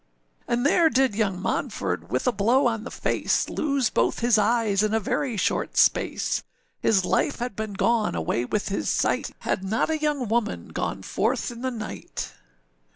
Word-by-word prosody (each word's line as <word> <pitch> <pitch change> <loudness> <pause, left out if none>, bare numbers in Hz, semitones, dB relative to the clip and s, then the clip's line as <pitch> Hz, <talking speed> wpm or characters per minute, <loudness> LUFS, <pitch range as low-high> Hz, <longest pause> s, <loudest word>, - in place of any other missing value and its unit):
âAnd 240 0 +1
there 320 +3 +4
did 265 -5 +2
young 200 -4 0
Monford 95 - -2
with 125 +4 -1
a 250 - +4
blow 235 +6 +2
on 225 -2 0
the - - -5
face - - 0
Lose 275 -5 0
both - - +1
his 240 -1 +4
eyes 210 -2 +2
in 215 +1 +1
a - - +3
very 235 +3 -1
short - - -1
space; - - +2 0.4
His 190 -4 +2
life 285 - +1
had 245 -3 -4
been 215 -1 -4
gone 225 - +1
away 85 +8 -1
with 210 +11 -2
his 195 - -1
sight, - - +1
Had 185 - -1
not 220 +10 0
a 315 - 0
young 295 -5 0
woman 225 0 -1
gone - - -3
forth - - -1
in 235 0 -9
the 260 - -1
night. 220 -4 -6
225 Hz, 180 wpm, -25 LUFS, 200-250 Hz, 0.4 s, there